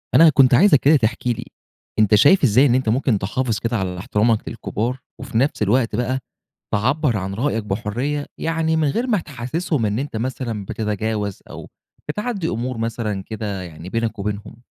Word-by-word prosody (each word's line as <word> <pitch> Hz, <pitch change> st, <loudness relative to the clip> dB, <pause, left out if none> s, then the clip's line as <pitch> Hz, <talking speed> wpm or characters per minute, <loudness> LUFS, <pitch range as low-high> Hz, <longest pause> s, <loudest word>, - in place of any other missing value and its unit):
أنا 165 Hz, -1 st, +8 dB
كنت 135 Hz, -4 st, +5 dB
عايزك 145 Hz, +2 st, +6 dB
كده 145 Hz, +4 st, +5 dB
تحكِي 120 Hz, -1 st, +1 dB
لي -, -, -6 dB, 0.6 s
أنت 105 Hz, -1 st, +5 dB
شايف 150 Hz, -, +5 dB
إزاي 130 Hz, +2 st, +5 dB
إن 125 Hz, -3 st, +3 dB
أنت 130 Hz, -3 st, +1 dB
ممكن 120 Hz, -2 st, +1 dB
تحافظ 110 Hz, +3 st, -1 dB
كده 115 Hz, 0 st, -1 dB
على 90 Hz, -2 st, -3 dB
احترامك 105 Hz, +4 st, 0 dB
للكبار، 120 Hz, +5 st, -3 dB, 0.2 s
وفي 130 Hz, -4 st, -4 dB
نفس 135 Hz, +1 st, +1 dB
الوقت 115 Hz, +2 st, +2 dB
بقى 125 Hz, +3 st, -1 dB, 0.6 s
تعبّر 130 Hz, +4 st, +1 dB
عن 95 Hz, -1 st, -3 dB
رأيك 115 Hz, -1 st, -1 dB
بحرية، 115 Hz, +8 st, -2 dB
يعني 160 Hz, 0 st, 0 dB
من 155 Hz, -2 st, +2 dB
غير 230 Hz, -, -1 dB
ما 220 Hz, -6 st, +2 dB
تحسسهم 140 Hz, -1 st, -2 dB
إن 105 Hz, +2 st, -1 dB
أنت 135 Hz, -3 st, -4 dB
مثلًا 115 Hz, -3 st, -3 dB
بتتجاوز، 105 Hz, -1 st, -3 dB
أو -, -, -9 dB, 0.4 s
بتعدّي 205 Hz, +1 st, -2 dB
أمور 120 Hz, +2 st, -3 dB
مثلًا 110 Hz, -3 st, -2 dB
كده 105 Hz, -3 st, -4 dB
يعني 85 Hz, 0 st, -9 dB
بينك 115 Hz, +1 st, -2 dB
وبينهم؟ 105 Hz, +3 st, -5 dB
120 Hz, 170 wpm, -21 LUFS, 105-140 Hz, 0.6 s, أنا